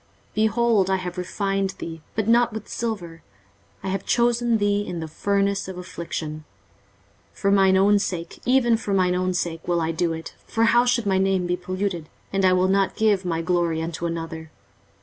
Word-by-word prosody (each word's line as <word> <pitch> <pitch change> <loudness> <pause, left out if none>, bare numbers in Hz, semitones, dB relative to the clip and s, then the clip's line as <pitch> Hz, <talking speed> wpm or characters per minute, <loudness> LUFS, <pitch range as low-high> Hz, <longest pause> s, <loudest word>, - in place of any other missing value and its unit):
23:048:010 - - -36
Behold, 220 -2 +2
I 190 - +3
have 180 -1 -5
refined 195 +1 -1
thee, 165 -1 -7
but 220 -1 -1
not 235 +1 +4
with 220 -1 -6
silver; 175 -8 -4 0.6
I 195 - -2
have 195 0 -2
chosen 240 -1 +2
thee 205 -1 +1
in 180 -4 -5
the 160 - -4
furnace 200 +4 0
of 190 -1 -7
affliction. 170 -4 -5 0.9
23:048:011 - - -22
For 200 - +3
mine 190 -1 +5
own 200 +2 +5
sake, 175 -4 -4
even 245 -2 +3
for 200 -3 -2
mine 180 -1 +3
own 185 0 0
sake, 165 -2 -3
will 175 -1 +2
I 165 0 0
do 165 +1 0
it: 160 0 -7
for 225 - 0
how 240 +2 +5
should 240 -2 +1
my 190 -1 +2
name 190 -1 +1
be 175 0 0
polluted? 180 -2 -3 0.2
and 195 0 +1
I 185 - +5
will 185 0 +3
not 195 0 +2
give 205 -4 +2
my 165 -2 -1
glory 170 -2 +1
unto 165 +1 -3
another. 165 -1 -5
190 Hz, 195 wpm, -24 LUFS, 170-205 Hz, 0.9 s, mine